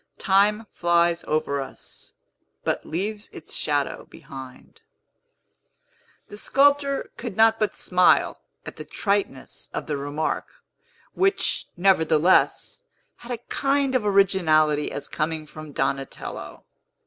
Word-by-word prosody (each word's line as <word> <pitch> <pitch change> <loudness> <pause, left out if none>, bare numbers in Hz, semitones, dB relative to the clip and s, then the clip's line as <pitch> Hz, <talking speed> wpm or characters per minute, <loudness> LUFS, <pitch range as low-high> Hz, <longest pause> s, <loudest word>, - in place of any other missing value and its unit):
Time 205 +3 +3
flies 170 0 +2
over 140 -2 0
us, 135 - -10 0.5
but - - -2
leaves 205 +6 -4
its 160 - -9
shadow 145 -2 -1
behind." 130 -2 -12 1.5
The 205 - -10
sculptor 280 +3 +2
could 230 -5 -6
not 225 0 +5
but 215 - 0
smile 180 0 +3 0.2
at - - -9
the - - -6
triteness 200 - -2
of - - -3
the 150 -2 -2
remark, 145 +3 -2 0.7
which, 390 +1 0
nevertheless, 175 - +3 0.4
had 240 - -10
a 240 -1 -4
kind 275 -1 +1
of 255 -4 +2
originality 170 -7 +3
as - - -5
coming 155 0 -2
from 155 0 -10
Donatello. 135 0 -4
180 Hz, 115 wpm, -24 LUFS, 155-220 Hz, 1.5 s, not